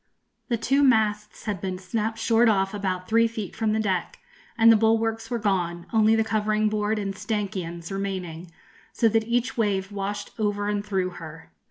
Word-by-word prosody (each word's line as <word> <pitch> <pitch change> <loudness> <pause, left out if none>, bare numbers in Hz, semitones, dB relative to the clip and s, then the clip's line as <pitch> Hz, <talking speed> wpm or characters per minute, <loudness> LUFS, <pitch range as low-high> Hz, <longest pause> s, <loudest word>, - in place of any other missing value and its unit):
The 235 - +1
two 270 +5 +2
masts 215 -5 +1
had 205 -5 -3
been 185 -1 -3
snapped 215 +4 -3
short 225 +1 +3
off 195 -2 +1
about 185 -3 -3
three 230 +1 +4
feet 220 -5 -6
from 220 -1 0
the 220 - +1
deck, 190 -5 -1 0.4
and 230 0 +7
the - - +7
bulwarks 225 +1 +1
were 240 - -1
gone, 180 -5 -1
only 220 0 +5
the 225 - +3
covering 215 -1 +1
board 210 0 0
and 195 -2 -3
stanchions 195 -5 -4
remaining, 185 -4 -4 0.4
so 230 - +3
that 220 0 +1
each 240 +1 0
wave 195 -2 0
washed 205 0 -4
over 205 -1 0
and 205 -1 -1
through 190 -3 -1
her. 160 -2 -11
210 Hz, 180 wpm, -25 LUFS, 190-225 Hz, 0.4 s, and